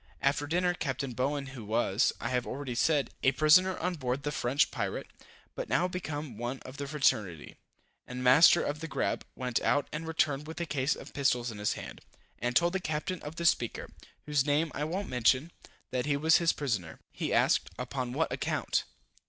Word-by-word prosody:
After 145 +1 +1
dinner, 180 +3 +1
Capt. 135 -6 -3
Bowen, 140 +3 -1
who 120 -4 -8
was, 110 0 +2
I 120 - -3
have 125 -1 -1
already 135 -1 -4
said, 140 +1 +1
a 135 - +3
prisoner 180 +7 +5
on 180 +2 -1
board 130 -3 -3
the 145 - -1
French 140 +1 +1
pirate, - - -3 0.5
but - - -5
now 180 - +2
become 150 - -5
one 120 +3 -3
of 130 +2 -10
the 140 - -4
fraternity, 105 - 0 0.5
and 125 0 -5
master 150 +7 +7
of 145 +1 -2
the 165 - -5
grab, - - -1
went 125 -2 -1
out, 145 - +2
and 160 +2 -4
returned 150 -2 0
with 160 - -7
a 170 - -1
case 140 -2 0
of - - -11
pistols 125 -4 +1
in 105 - -9
his 105 - +1
hand, - - -8 0.4
and 120 +1 -2
told 170 +1 +4
the 190 - 0
Captain 165 +1 -3
of 150 +2 -7
the 170 - -4
Speaker, 120 -8 +1 0.3
whose 150 -2 +2
name 150 +2 +1
I 150 - -2
won't 185 +6 -3
mention, 130 +5 +2 0.4
that 125 +1 -1
he 145 -1 +2
was 160 +3 +5
his 170 -1 +3
prisoner. 110 - -3
He - - -3
asked, - - +3
upon 125 0 -3
what 155 +6 0
account? - - -1
140 Hz, 195 wpm, -30 LUFS, 125-160 Hz, 0.5 s, master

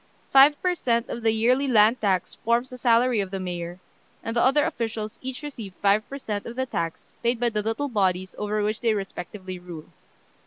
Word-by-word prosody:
Five 280 +2 +7
per 365 -1 +2
cent. 235 -8 0
of 235 - -4
the 225 - +3
yearly 245 +5 +2
land 225 0 +4
tax 190 -4 0
forms 235 +3 +1
the 250 - -9
salary 240 0 +3
of 195 -2 -1
the 195 0 -4
mayor, 175 -1 -5 0.4
and 225 - -4
the 235 - +3
other 275 +3 +4
officials 225 -1 -4
each 260 +2 -6
receive 225 -10 -7
five 205 +1 +2
per 275 - -5
cent. 210 -6 -4
of 235 - -7
the 260 +1 -1
tax 165 -9 -4
paid 235 0 +1
by 240 0 +2
the 215 -2 -1
little 225 +7 -2
bodies 190 -6 0
over 210 0 -1
which 215 +1 -1
they 225 -2 +2
respectively 185 -1 -6
rule. 175 -3 -10
225 Hz, 205 wpm, -25 LUFS, 195-245 Hz, 0.4 s, Five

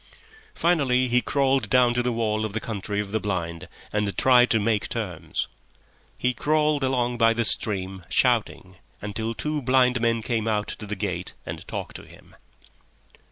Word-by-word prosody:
Finally 135 -7 +2
he 125 +1 +3
crawled 135 -5 +1
down 125 0 +4
to 120 - +1
the 125 0 0
wall 110 -2 0
of 110 -2 -3
the 115 - -1
Country 105 -2 -4
of 100 -1 -3
the 110 - 0
Blind 85 -5 -3 0.3
and 105 -1 -1
tried 125 -1 +5
to 115 - +3
make 105 0 +1
his - - -6
terms. 100 -8 -3 0.7
He 125 0 +1
crawled 150 +2 +1
along 125 -2 0
by 115 0 +4
the 115 0 +1
stream, 95 -4 -1
shouting, 110 -7 0 0.2
until 110 +3 -4
two 150 +3 -2
blind 125 -1 +3
men 115 -1 +1
came 115 -2 -1
out 105 -1 0
to 105 - -7
the 105 - -3
gate 95 -2 -4
and - - -7
talked - - -5
to - - -12
him. - - -17
115 Hz, 175 wpm, -25 LUFS, 105-125 Hz, 0.7 s, tried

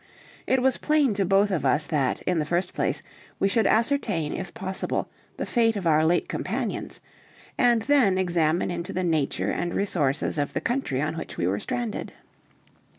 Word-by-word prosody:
It 260 -1 +2
was 265 -1 +3
plain 300 -6 +2
to 195 -1 0
both 195 +2 +3
of 175 -6 -1
us 145 +3 +2
that, 140 -5 0
in 180 -2 0
the 150 - 0
first 175 +4 -1
place, - - -1 0.3
we 195 - +2
should 215 +1 +2
ascertain 220 - +1
if 185 -2 -5
possible 190 0 -3 0.3
the - - -2
fate 230 -2 +2
of 195 -3 -4
our 155 -1 +4
late 170 +2 +2
companions, - - -3 0.5
and 240 -3 +3
then 250 -8 +3
examine 175 -2 +1
into 170 -1 -4
the 185 - -1
nature 160 -5 0
and 175 0 -2
resources 150 -7 0
of 145 - -1
the - - 0
country 230 - -1
on 155 +2 -2
which - - -8
we 85 - 0
were 95 +3 0
stranded. 235 - -4
185 Hz, 180 wpm, -25 LUFS, 155-225 Hz, 0.5 s, our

